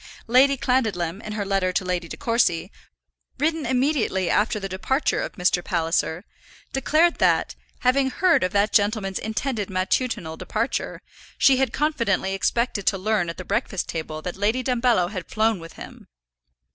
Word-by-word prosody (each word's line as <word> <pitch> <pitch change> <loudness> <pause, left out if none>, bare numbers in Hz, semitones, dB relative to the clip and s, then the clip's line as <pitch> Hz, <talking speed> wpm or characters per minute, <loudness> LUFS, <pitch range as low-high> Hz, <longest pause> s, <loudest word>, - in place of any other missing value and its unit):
Lady 265 +4 +4
Clandidlem, 215 -9 0
in 215 - -6
her 210 -1 -3
letter 195 -2 +1
to 185 - -1
Lady 180 -2 -2
De - - -8
Courcy, 230 -9 +1 0.7
written 310 -1 0
immediately 250 - +1
after 215 0 +1
the 195 - -4
departure 265 - 0
of - - -4
Mr. 180 0 +1
Palliser, 165 +1 -1 0.5
declared 310 +6 +2
that, - - +2 0.3
having 265 +1 +3
heard 355 - +3
of 185 - 0
that 205 +1 +1
gentleman's 205 -2 +1
intended 220 -1 -3
matutinal 185 -2 -1
departure, - - -3 0.3
she 270 -1 +5
had 265 0 +1
confidently 235 -11 0
expected 205 +1 -1
to 195 - +3
learn 195 -3 0
at 165 - -6
the 185 - -7
breakfast 195 +1 -2
table 155 -1 -5
that 180 - -5
Lady 220 +6 0
Dumbello 235 -7 +2
had 185 -5 -6
flown 220 -2 +1
with 165 0 -11
him. - - -11
210 Hz, 160 wpm, -23 LUFS, 185-255 Hz, 0.7 s, she